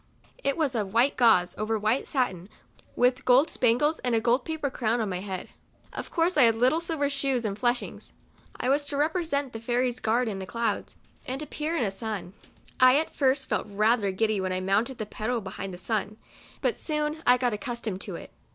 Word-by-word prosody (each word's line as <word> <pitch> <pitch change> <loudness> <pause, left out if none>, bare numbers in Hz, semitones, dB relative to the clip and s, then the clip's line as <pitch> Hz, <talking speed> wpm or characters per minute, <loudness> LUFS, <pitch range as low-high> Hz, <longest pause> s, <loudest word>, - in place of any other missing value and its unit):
It 275 - 0
was 300 -5 +1
of 210 -3 -3
white 250 +4 +4
gauze, 200 -8 +4
over 220 +1 0
white 215 +5 0
satin, 195 - -1 0.5
with 250 +1 +2
gold 260 +5 +4
spangles, 255 +7 +2
and 245 -2 0
a - - +3
gold 240 +3 +1
paper 315 -4 -3
crown 235 -2 0
on 220 -3 -1
my 180 -1 -3
head. 190 -1 -6 0.4
Of - - -6
course 335 0 +1
I - - +6
had 230 -2 +5
little 255 +7 +3
silver 325 -4 0
shoes 275 -4 -1
and 200 -2 -1
fleshings. 240 +3 -2 0.5
I - - -1
was 285 +2 +2
to 285 - -3
represent 295 -3 0
the 225 - -5
Fairy's 245 +1 0
guard 230 +3 +1
in 200 -3 -3
the 190 - -6
clouds, 230 -2 -2 0.3
and 260 +1 -3
to - - -4
appear 310 +3 -3
in 250 - +1
a 200 - 0
sun. 200 -3 -5 0.5
I 255 +1 +7
at 315 - -1
first 270 -1 +2
felt - - -1
rather 215 +1 +2
giddy 215 +1 0
when 185 0 -2
I 185 - -1
mounted 205 +7 0
the 215 - -4
pedal 220 +3 -2
behind 195 -1 -6
the 180 - -8
sun, 215 +2 -1 0.4
but - - +2
I - - -22
soon 300 0 -2 0.2
got 245 -2 0
accustomed 220 -4 -4
to - - -6
it. - - -9
240 Hz, 210 wpm, -27 LUFS, 215-275 Hz, 0.5 s, I